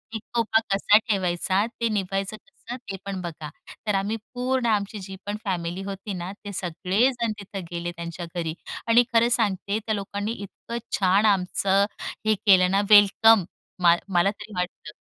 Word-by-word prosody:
एकोपा 225 0 0
कसा 205 +2 +5
ठेवायचा 190 -2 0 0.2
ते 230 - +3
निघायचं 195 0 -2
कसं 240 - -10
ते 195 - -4
पण 195 -2 -4
बघा 160 -3 -6 0.4
तर 205 - +2
आम्ही 200 +3 0 0.2
पूर्ण 250 0 0
आमची 210 -1 0
जी 190 0 -8
पण 205 +1 -3
फॅमिली 175 -1 -2
होती 195 +1 -5
ना 180 +1 -5
ते 205 - -5
सगळेजण 215 +8 0
तिथं 200 -1 -7
गेले 175 0 -3
त्यांच्या 170 +1 -6
घरी 165 -2 -2 0.3
आणि 235 +2 +6
खरं 230 +1 +4
सांगते 205 -2 0
त्या 220 0 -2
लोकांनी 200 +2 -3
इतकं 230 +2 -7 0.2
छान 195 +3 +4
आमचं 195 0 +2 0.4
हे 215 0 +4
केलं 185 -2 +6
ना 200 +1 +3
वेलकम 205 0 +7 0.4
मा 170 -1 +7 0.2
मला 175 +3 +4
तरी 210 0 -12
वाटतं 180 0 -4
200 Hz, 160 wpm, -25 LUFS, 185-215 Hz, 0.4 s, वेलकम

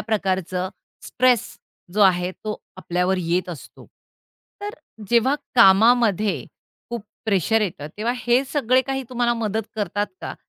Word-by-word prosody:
प्रकारचं 190 -4 -1 0.4
स्ट्रेस 250 -3 +3 0.5
जो 210 - +1
आहे 180 -2 +3
तो 210 +2 -6 0.2
आपल्यावर 180 0 0
येत 180 +2 -1
असतो. 165 -6 -10 0.7
तर 410 0 -4 0.4
जेव्हा 240 +4 +4 0.2
कामामध्ये 215 -1 +4 0.5
खूप 235 -3 -5 0.2
प्रेशर 220 +1 +2
येतं 175 -8 -3
तेव्हा 225 +3 -1
हे 245 +1 +2
सगळे 260 -3 +3
काही 270 0 -3
तुम्हाला 240 -1 +1
मदत 220 -1 -1
करतात 205 -1 -1
का? - - -5
215 Hz, 125 wpm, -22 LUFS, 185-240 Hz, 0.7 s, जेव्हा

